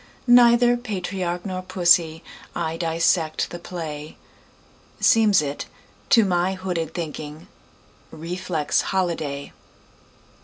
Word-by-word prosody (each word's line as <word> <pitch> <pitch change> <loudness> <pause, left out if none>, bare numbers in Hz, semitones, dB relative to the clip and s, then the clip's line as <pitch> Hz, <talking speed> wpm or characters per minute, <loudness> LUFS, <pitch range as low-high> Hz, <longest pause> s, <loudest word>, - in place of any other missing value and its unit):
Neither 240 0 +6
patriarch 185 -6 -4
nor 185 -2 -4
pussy,I 170 -2 0
dissect 165 -1 0
the 175 - -7
play; 155 -4 -7 0.8
Seems 215 -8 +4
it, 140 0 -5 0.4
to 225 -3 +5
my 180 0 0
hooded 180 -4 -4
thinking, 155 -2 -6 0.6
Reflex 165 -1 -2
holiday. 160 -7 -3
175 Hz, 85 wpm, -23 LUFS, 160-190 Hz, 0.8 s, Neither